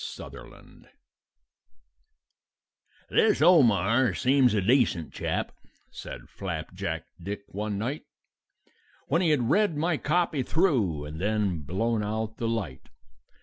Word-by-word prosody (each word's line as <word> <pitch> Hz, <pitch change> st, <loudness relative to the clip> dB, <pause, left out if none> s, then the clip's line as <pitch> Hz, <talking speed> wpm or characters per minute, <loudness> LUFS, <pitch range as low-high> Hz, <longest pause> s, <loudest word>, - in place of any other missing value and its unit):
SUTHERLAND -, -, -11 dB, 2.2 s
"This 220 Hz, -1 st, +3 dB
Omar 130 Hz, -, +4 dB
seems 130 Hz, -3 st, +3 dB
a 105 Hz, -, +2 dB
decent 110 Hz, -, +2 dB
chap," -, -, -2 dB, 0.4 s
said -, -, -9 dB
Flapjack -, -, -5 dB, 0.2 s
Dick 100 Hz, +3 st, -5 dB
one 105 Hz, +1 st, -3 dB
night, 125 Hz, +9 st, -3 dB, 1.0 s
When 165 Hz, +7 st, +2 dB
he 175 Hz, -, +2 dB
had 130 Hz, -5 st, +2 dB
read 205 Hz, -7 st, +2 dB
my 160 Hz, +1 st, +1 dB
copy 160 Hz, -2 st, 0 dB
through 120 Hz, -, +1 dB
and 75 Hz, +3 st, -7 dB
then 100 Hz, -4 st, 0 dB
blown 105 Hz, +9 st, -1 dB
out 110 Hz, +1 st, -3 dB
the 115 Hz, -, -2 dB
light. 100 Hz, -, -4 dB
115 Hz, 110 wpm, -27 LUFS, 100-145 Hz, 2.2 s, Omar